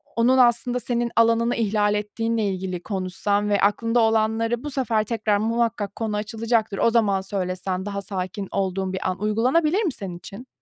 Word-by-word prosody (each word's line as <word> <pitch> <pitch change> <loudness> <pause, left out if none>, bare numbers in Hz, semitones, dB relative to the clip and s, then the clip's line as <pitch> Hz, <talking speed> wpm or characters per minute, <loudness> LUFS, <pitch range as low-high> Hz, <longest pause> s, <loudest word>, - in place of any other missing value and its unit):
onun 245 +3 +3
aslında 245 0 +3
senin 240 -1 -1
alanını 230 +1 +3
ihlal 210 -2 +1
ettiğinle 225 +2 -1
ilgili 185 -2 -3
konuşsan 200 +1 -1
ve 205 - +2
aklında 230 +4 +2
olanları 225 +1 +1
bu 295 - -5
sefer 235 -5 0
tekrar 215 -2 0
muhakkak 225 -2 -1
konu 215 -2 -2
açılacaktır, 220 0 -1
o 230 - +3
zaman 210 -4 +2
söylesen, 185 -1 -3
daha 200 -1 -4
sakin 195 0 -5
olduğun 190 0 -1
bir 185 - -2
an. 185 0 -4
Uygulanabilir 265 - +2
mi 345 - 0
senin 180 -3 -6
için? 200 +8 -11
215 Hz, 165 wpm, -23 LUFS, 195-230 Hz, -, onun